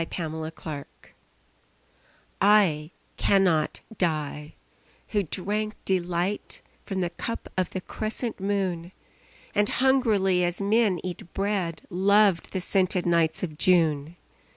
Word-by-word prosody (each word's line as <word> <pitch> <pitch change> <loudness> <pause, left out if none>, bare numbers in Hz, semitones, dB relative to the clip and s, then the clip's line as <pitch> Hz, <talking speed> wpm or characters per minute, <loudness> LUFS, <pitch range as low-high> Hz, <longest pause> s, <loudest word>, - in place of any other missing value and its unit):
The 160 -1 -4
Wine 145 -3 -6 1.6
I 190 -7 +4 0.3
cannot 180 -6 +2 0.2
die, 150 -3 -2 0.5
who 210 - +1
drank 210 +4 -2
delight 180 +1 -1 0.2
From 190 -2 -2
the 175 -1 -1
cup 230 +6 -5
of 185 -2 0
the 185 - -5
crescent 220 +4 -3
moon, 190 -3 -2 0.6
And 205 0 +3
hungrily 220 -9 +3
as 175 0 -1
men 205 -1 +2
eat 180 -1 -6
bread, 195 -4 -1
Loved 195 -1 +3
the 190 - -2
scented 185 -1 +1
nights 170 -1 +2
of 155 -3 -5
June. 160 -3 +3
185 Hz, 110 wpm, -26 LUFS, 165-200 Hz, 1.6 s, I